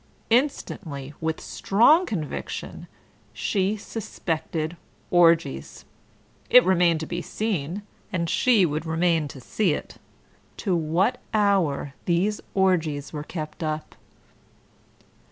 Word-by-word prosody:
Instantly, 170 - -1
with 160 0 -1
strong 300 - +3
conviction, 155 -8 -5 0.5
she 200 +1 0
suspected 165 -6 -4 0.4
orgies. 165 - +3 0.6
It 250 - +8
remained 175 -3 +3
to - - -3
be 175 +2 -4
seen 195 -3 -3 0.3
(and 170 -4 -1
she 220 +2 +4
would 155 +1 -2
remain 165 -1 +1
to 140 - -10
see 180 - 0
it) - - -8 0.6
to 190 -5 0
what 170 +7 +1 0.2
hour 185 -10 +2
these 185 +5 +1
orgies 165 -7 +1
were 150 -1 -4
kept 155 0 -6
up. 155 -1 -3
170 Hz, 105 wpm, -25 LUFS, 155-200 Hz, 0.6 s, It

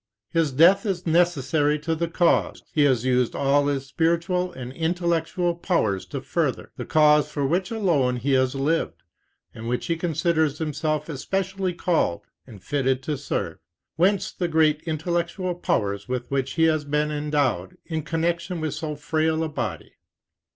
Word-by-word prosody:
His 165 -4 +1
death 170 +9 +5
is 185 -3 -2
necessary 155 -3 +2
to 160 +2 -2
the 170 +1 -1
cause 170 +1 +1
he 150 -2 +4
has 130 -4 +2
used 125 -2 +1
all 140 +1 +2
his 140 -2 -1
spiritual 170 +5 0
and 130 -3 -8
intellectual 170 +2 0
powers 165 - 0
to - - -5
further, - - -2
the - - -6
cause 150 -1 +4
for 145 -2 -2
which 180 +6 0
alone 165 - +1
he 125 +3 -1
has 130 0 +2
lived, 150 +5 -1 0.5
and 115 +1 -6
which 125 - -1
he 170 - 0
considers 160 -2 0
himself 155 -1 -2
especially 190 +4 -2
called 165 - 0 0.3
and 105 -5 -13
fitted 135 -2 0
to 150 +2 -2
serve; 140 +1 -3 0.4
whence 190 +4 +2
the 175 - -2
great 155 -2 +3
intellectual 170 +3 -1
powers 100 - -1
with 125 -1 -2
which 135 -1 -1
he 160 - +1
has 155 -2 +3
been 150 +1 0
endowed, 145 -11 -1
in 160 -2 -3
connection 170 +2 -2
with 155 -2 -2
so 155 -2 -4
frail 160 +2 0
a 160 - -2
body. 115 - -5
155 Hz, 160 wpm, -24 LUFS, 135-170 Hz, 0.5 s, death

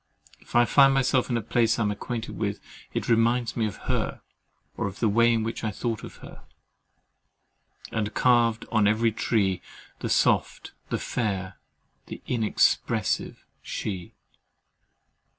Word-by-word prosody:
If - - -13
I 120 0 +6
find 135 +1 +5
myself 130 -1 +2
in 120 - +1
a 115 - -3
place 115 +1 +2
I 115 - +1
am 105 - +1
acquainted 115 +2 -5
with, 105 -2 -2 0.3
it - - -3
reminds 115 +1 +2
me 115 -2 +1
of 105 - -6
her, - - -2 0.5
of 100 -1 -4
the 115 - +2
way 115 +3 +4
in 115 -1 +1
which 115 +1 -4
I 110 - 0
thought 110 +2 -3
of - - -9
her, - - -12 1.5
—"and 105 -1 -2
carved 115 -2 +3
on 110 -2 +3
every 110 +2 +2
tree 100 -4 0 0.4
The - - -3
soft, - - +1 0.2
the - - 0
fair, 95 -5 -3 0.5
the - - -7
inexpressive 110 -4 0 0.2
she!" 95 -4 -5
115 Hz, 145 wpm, -26 LUFS, 105-120 Hz, 1.5 s, I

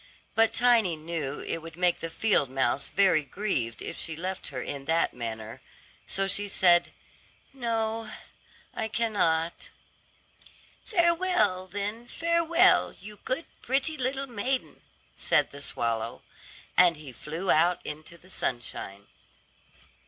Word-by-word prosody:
But 225 0 +4
Tiny 230 -7 +4
knew 155 -3 -4
it - - -3
would 165 -1 -10
make 180 -1 +2
the 165 - -4
field 180 - +2
mouse 130 +1 0
very 190 -6 +3
grieved 135 - -2
if - - -5
she 165 - -2
left 185 +3 -4
her 130 - -5
in 140 +2 -5
that 165 +2 +1
manner, 110 -2 -6 0.5
so 195 - +2
she 200 +1 0
said, 175 -3 +4 0.6
"No, 225 -3 -2 0.6
I 220 - -2
cannot." 185 -8 0 1.1
"Farewell, 340 - +2
then, 205 +5 -4
farewell, 335 +3 +3
you 210 +2 -11
good, 260 +6 -2 0.2
pretty 275 +5 0
little 265 0 -1
maiden," 255 +2 -3 0.3
said - - +2
the 140 - -10
swallow; 115 -3 -2 0.5
and 175 -3 +6
he 150 -3 -10
flew 165 +8 -2
out 170 +3 +4
into 155 +3 -7
the 185 +3 -15
sunshine. 100 - -3
185 Hz, 125 wpm, -28 LUFS, 155-230 Hz, 1.1 s, and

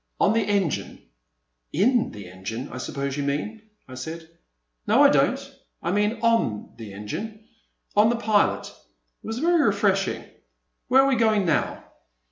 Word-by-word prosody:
On - - +4
the 225 - +2
engine." 200 -6 -1 0.7
In 230 - +2
the 100 -3 -10
engine 95 +8 -6
I 125 - -7
suppose 140 +1 -3
you - - -1
mean," 150 +11 -3 0.3
I 130 - -11
said. 160 +6 -7 0.6
No - - +5
I - - +8
don't; - - +3 0.4
I - - 0
mean 210 +3 +1
on 230 - +1
the 110 -3 -9
engine,— 210 - -7 0.5
on 210 +2 +5
the 240 - +1
pilot. 215 -3 +2 0.6
It - - -9
was 225 +1 -3
very 335 +4 +3
refreshing. 200 -3 +1 0.6
Where 265 +1 +6
are - - +3
we 270 -2 +2
going 215 -3 +3
now?" 160 -4 0
200 Hz, 155 wpm, -24 LUFS, 140-225 Hz, 0.7 s, I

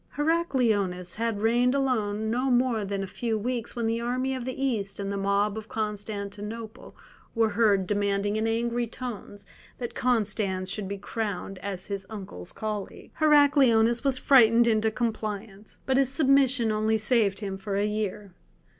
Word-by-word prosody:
Heracleonas 230 - 0
had 225 -2 -1
reigned 240 +3 +3
alone 220 -6 0
no 255 +3 0
more 245 -3 +2
than 195 0 -3
a 190 - -9
few 230 -2 +1
weeks 235 +2 -3
when 235 -1 -2
the 230 +1 0
army 255 +2 -1
of 255 -2 -4
the 260 0 -5
East 205 -7 -2
and 200 0 -3
the - - -2
mob 200 +2 0
of 220 - -12
Constantinople 210 +1 -5 0.4
were 225 -1 +3
heard 205 -3 +3
demanding 205 +1 0
in 220 +1 0
angry 235 +1 0
tones 220 -4 -8 0.3
that 240 -2 -5
Constans 205 -6 0
should 200 -1 -3
be 200 +1 -4
crowned 195 -2 -4
as 190 -1 -5
his 195 -2 -5
uncle's 190 - -8
colleague. 210 -2 -6
Heracleonas 275 -7 +4
was 270 -2 +3
frightened 235 -3 +5
into 220 -1 +2
compliance, 215 -2 -4
but 265 0 +2
his 270 -1 +2
submission 265 -5 +3
only 215 +1 +1
saved 220 -2 +1
him 195 -2 -3
for 195 +1 -4
a 200 +1 +1
year. 210 -2 -3
220 Hz, 160 wpm, -27 LUFS, 200-240 Hz, 0.4 s, frightened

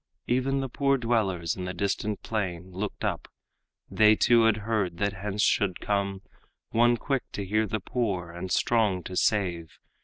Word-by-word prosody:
Even 135 +2 +1
the 135 - -2
poor 140 +2 +1
dwellers 105 -9 0
in 90 - -5
the 90 0 -5
distant 100 +2 -2
plain 95 -4 -3
Looked 95 +3 -4
up; - - -2 0.6
they 110 0 +5
too 115 +1 +4
had 115 -2 +4
heard 105 -6 -1
that 100 +2 0
hence 105 +1 -2
should 100 -5 +2
come 100 -1 -1 0.5
One 120 +1 +4
quick 135 +1 -1
to 100 - -4
hear 110 +3 +1
the 110 +2 -2
poor 95 -6 -2
and 90 +2 -6
strong 105 -4 +2
to 90 - -7
save. 90 -6 0
105 Hz, 165 wpm, -27 LUFS, 95-115 Hz, 0.6 s, they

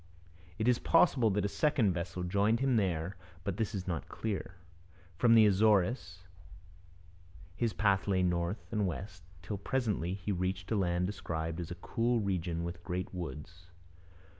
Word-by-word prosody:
It 110 - -1
is 125 -1 +4
possible 140 -9 +4
that 100 0 0
a - - +3
second 120 - +2
vessel 85 +1 -4
joined 100 +5 +2
him 135 -1 +2
there, 90 -3 0 0.3
but - - -3
this 110 -1 -1
is 95 -2 -4
not 85 -4 -3
clear. 100 -4 -4 0.6
From 115 -2 +6
the 110 -1 +8
Azores 100 -2 +2 1.3
his 115 +2 0
path 100 -3 +2
lay 95 -2 +2
north 90 +3 -1
and 105 -3 +1
west, 95 +2 -6 0.2
till 100 +2 -4
presently 100 -7 -1
he 100 +1 -4
reached 90 0 -2
a - - +3
land 90 -2 +1
described 80 -4 -3
as 85 - -5
a 85 - -5
'cool 115 +6 0
region 90 -4 -1
with 85 0 -6
great 90 +2 -4
woods.' 85 +1 -7
95 Hz, 160 wpm, -32 LUFS, 90-110 Hz, 1.3 s, the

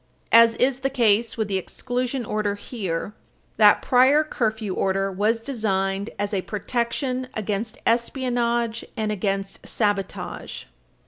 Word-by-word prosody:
As 230 0 +7
is 255 +1 +1
the 270 0 0
case 230 -3 +2
with 220 -2 0
the 195 -2 0
exclusion 245 +5 -3
order 210 -1 -1
here, 200 -4 -4 0.4
that 210 -1 +6
prior 265 +4 +5
curfew 220 -8 -2
order 195 +1 0
was 210 +4 +1
designed 200 -5 -1
as 205 +1 -2
a 195 - +1
"protection 250 +5 -2
against 215 +2 -3
espionage 235 -1 0
and 215 -1 -1
against 195 -1 -2
sabotage." 205 -3 -3
220 Hz, 125 wpm, -24 LUFS, 200-245 Hz, 0.4 s, As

